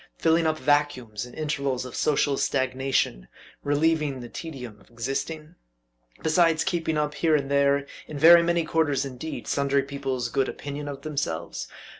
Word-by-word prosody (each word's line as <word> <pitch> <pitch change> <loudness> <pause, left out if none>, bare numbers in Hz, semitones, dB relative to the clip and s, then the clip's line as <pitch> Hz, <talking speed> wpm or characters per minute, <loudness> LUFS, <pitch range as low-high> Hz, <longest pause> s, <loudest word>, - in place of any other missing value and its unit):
filling 165 0 +3
up 155 0 +1
vacuums, 130 -7 0
in 120 - -13
intervals 140 -4 -2
of 125 - -8
social 145 -1 +2
stagnation 130 - 0 0.4
relieving 145 -1 +1
the 120 - -7
tedium 125 -7 -8
of 100 - -22
existing? 140 +7 -4 0.7
besides 160 0 +3
keeping 165 -3 -1
up, 150 0 0
here 160 -1 +2
and 140 -2 -1
there, 140 0 +3 0.2
in 150 - -6
very 170 +3 +8
many 170 -1 +1
quarters 155 -4 +1
indeed, 135 +4 -6
sundry 140 -1 +1
people's 135 -3 -3
good 135 +1 0
opinion 145 +1 -6
of 140 -1 -7
themselves? 140 - -3
140 Hz, 150 wpm, -26 LUFS, 130-155 Hz, 0.7 s, very